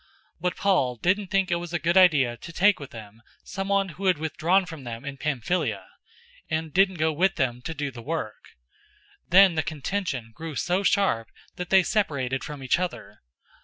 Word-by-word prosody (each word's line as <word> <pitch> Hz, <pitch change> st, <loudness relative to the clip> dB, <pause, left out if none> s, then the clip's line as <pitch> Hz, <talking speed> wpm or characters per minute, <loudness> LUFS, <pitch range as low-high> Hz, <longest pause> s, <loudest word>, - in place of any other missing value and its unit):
015:038 -, -, -33 dB, 0.3 s
But 180 Hz, +1 st, -1 dB
Paul 175 Hz, -11 st, +1 dB
didn't 185 Hz, -, 0 dB
think 195 Hz, 0 st, +1 dB
that -, -, +1 dB
it -, -, +2 dB
was 170 Hz, 0 st, -7 dB
a -, -, +2 dB
good 170 Hz, +2 st, 0 dB
idea 150 Hz, -10 st, +5 dB
to 145 Hz, +8 st, -10 dB
take 200 Hz, +4 st, +3 dB
with 140 Hz, -, -8 dB
them 110 Hz, 0 st, -12 dB, 0.2 s
someone 195 Hz, 0 st, -1 dB
who 190 Hz, +3 st, -4 dB
had 185 Hz, -, +4 dB
withdrawn 165 Hz, +5 st, +1 dB
from 160 Hz, -6 st, -9 dB
them 120 Hz, +1 st, -7 dB
in 140 Hz, -1 st, -5 dB
Pamphylia, 135 Hz, -, -1 dB, 0.6 s
and 160 Hz, -1 st, -2 dB
didn't 190 Hz, 0 st, +3 dB
go 160 Hz, -1 st, +1 dB
with 190 Hz, +5 st, +2 dB
them 125 Hz, -4 st, -1 dB
to 165 Hz, -, -5 dB
do 145 Hz, -2 st, -3 dB
the 120 Hz, -2 st, -10 dB
work. 135 Hz, -, -6 dB, 0.7 s
015:039 -, -, -44 dB
Then 190 Hz, +1 st, +7 dB
the 160 Hz, -, +1 dB
contention 150 Hz, -, -3 dB
grew 160 Hz, +3 st, -7 dB
so 180 Hz, +7 st, 0 dB
sharp 195 Hz, -, +1 dB, 0.3 s
that 180 Hz, -1 st, -5 dB
they 190 Hz, -1 st, +6 dB
separated 140 Hz, -, -1 dB
from 145 Hz, -2 st, -7 dB
each 130 Hz, -, +2 dB
other. 180 Hz, -1 st, -5 dB
160 Hz, 200 wpm, -25 LUFS, 130-185 Hz, 0.7 s, Then